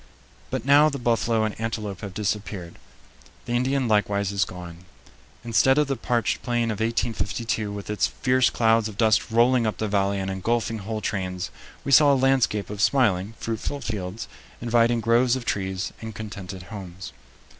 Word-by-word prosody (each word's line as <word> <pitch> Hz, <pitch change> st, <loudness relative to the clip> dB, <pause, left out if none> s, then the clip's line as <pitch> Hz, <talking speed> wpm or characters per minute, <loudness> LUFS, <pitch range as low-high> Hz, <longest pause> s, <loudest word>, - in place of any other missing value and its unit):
But -, -, -3 dB
now 145 Hz, +2 st, +6 dB
the 140 Hz, -, -4 dB
buffalo 115 Hz, -2 st, +1 dB
and 110 Hz, -1 st, -1 dB
antelope 105 Hz, -4 st, -4 dB
have 100 Hz, -2 st, -7 dB
disappeared; 100 Hz, -4 st, -3 dB, 0.7 s
the 120 Hz, -, -6 dB
Indian 130 Hz, +1 st, +1 dB
likewise 100 Hz, -2 st, +1 dB
is 100 Hz, -2 st, +1 dB
gone. 90 Hz, -1 st, -10 dB, 0.6 s
Instead 125 Hz, +3 st, +3 dB
of 150 Hz, -, +4 dB
the 135 Hz, -1 st, -1 dB
parched 120 Hz, -4 st, -1 dB
plain 120 Hz, -2 st, 0 dB
of 105 Hz, -, -5 dB
1852, 115 Hz, -1 st, -1 dB
with 100 Hz, -1 st, -7 dB
its 105 Hz, -1 st, +1 dB
fierce 130 Hz, -1 st, +2 dB
clouds 115 Hz, -1 st, +2 dB
of 105 Hz, -2 st, -9 dB
dust 110 Hz, 0 st, +3 dB
rolling 120 Hz, +1 st, +3 dB
up 110 Hz, -, -2 dB
the 110 Hz, -, -2 dB
valley 100 Hz, -1 st, +1 dB
and 95 Hz, 0 st, -2 dB
engulfing 115 Hz, +3 st, -1 dB
whole 110 Hz, +2 st, -4 dB
trains, 90 Hz, -3 st, -3 dB, 0.3 s
we 140 Hz, -, -3 dB
saw 145 Hz, +2 st, +7 dB
a -, -, +4 dB
landscape 130 Hz, -6 st, +1 dB
of 105 Hz, -1 st, -4 dB
smiling, 110 Hz, -5 st, +2 dB
fruitful 115 Hz, +5 st, -3 dB
fields, 105 Hz, -3 st, -5 dB, 0.3 s
inviting 120 Hz, 0 st, +2 dB
groves 120 Hz, +3 st, +3 dB
of 130 Hz, -2 st, -5 dB
trees, 95 Hz, -3 st, -2 dB
and 110 Hz, -2 st, -7 dB
contented 100 Hz, -3 st, -7 dB
homes. 95 Hz, -2 st, -8 dB
110 Hz, 165 wpm, -24 LUFS, 100-120 Hz, 0.7 s, saw